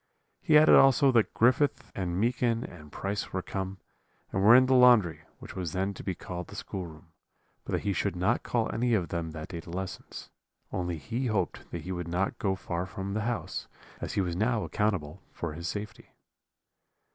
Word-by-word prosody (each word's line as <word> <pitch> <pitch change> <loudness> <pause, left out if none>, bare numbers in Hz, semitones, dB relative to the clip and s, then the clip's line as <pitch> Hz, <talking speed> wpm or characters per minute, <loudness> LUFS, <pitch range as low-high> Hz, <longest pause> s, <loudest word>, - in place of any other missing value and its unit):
He 155 - +5
added 155 +1 +7
also 135 0 +6
that 115 -4 +3
Griffith 130 +5 +2
and 90 -2 -2
Meekin 120 +1 +1
and 75 -4 -11
Price 100 +6 -3
were 95 -1 -2
come, 95 0 -4 0.5
and 95 - 0
were 110 +5 +8
in 130 +1 +7
the 130 - +2
laundry, 120 -9 +5
which - - -11
was 90 -4 -3
then 95 +2 -1
to - - -9
be 95 - -2
called 90 +1 -6
the - - -11
schoolroom; 85 -4 -7 0.5
but - - -6
that - - +1
he 100 -1 0
should 100 0 -1
not 95 +7 +1
call 115 -2 -1
any 120 0 +2
of 90 -6 -1
them 85 -1 -3
that 80 -1 -7
day 85 - -5
to 85 - -11
lessons; 95 +2 -6 0.4
only 90 -2 -2
he 115 - -3
hoped 110 -3 -2
that 85 -2 -6
he 90 - -5
would 90 -2 -4
not 90 +3 -1
go 95 -2 +1
far 90 -1 -4
from 95 +1 -5
the 110 - -1
house, 120 - -4 0.3
as - - -4
he - - +1
was 90 -2 -2
now 110 +3 +1
accountable 95 -5 -1
for 85 -3 -5
his 85 +2 -5
safety. 105 0 -6
95 Hz, 200 wpm, -29 LUFS, 90-115 Hz, 0.5 s, were